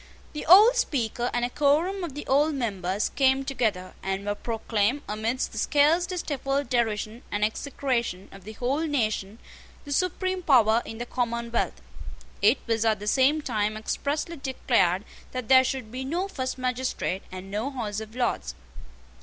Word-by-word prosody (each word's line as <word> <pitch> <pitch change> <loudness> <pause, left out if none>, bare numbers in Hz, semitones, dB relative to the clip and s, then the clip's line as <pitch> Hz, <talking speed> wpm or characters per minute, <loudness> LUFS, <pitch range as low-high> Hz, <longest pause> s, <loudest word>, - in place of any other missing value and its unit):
The 300 - -6
old 420 +9 +8
Speaker 245 - 0
and 240 0 0
a - - -2
quorum 320 +8 +2
of 310 -6 -5
the 295 - -6
old 290 +3 +2
members 200 -6 -1
came 270 0 +2
together, 215 -9 -1
and 195 +1 -3
were 205 - 0
proclaimed, 225 +4 -1
amidst 225 +5 -2
the - - -5
scarcely 335 +5 +2
stifled 275 -4 -2
derision 225 -1 -1
and 205 +1 +1
execration 235 -4 -2
of 195 -1 -13
the 215 +3 -9
whole 270 +8 -1
nation, 215 -7 -1 0.5
the 285 - -8
supreme 370 +4 0
power 235 -8 +4
in 225 - -7
the 240 - -4
commonwealth. 235 -1 -2 0.6
It 215 +6 +5
was 225 -1 0
at 220 -1 +2
the 205 - -7
same 275 +7 +3
time 215 -4 -1
expressly 295 +9 -2
declared 235 -8 +1 0.3
that 255 -3 -5
there 260 -1 +8
should 255 -4 -3
be 255 +2 -4
no 340 +8 -2
first 260 -10 -4
magistrate, 255 -6 -2
and 185 +1 -8
no 215 +6 -2
House 220 -6 -4
of 220 +1 -9
Lords. 65 - -1
245 Hz, 160 wpm, -26 LUFS, 215-285 Hz, 0.6 s, old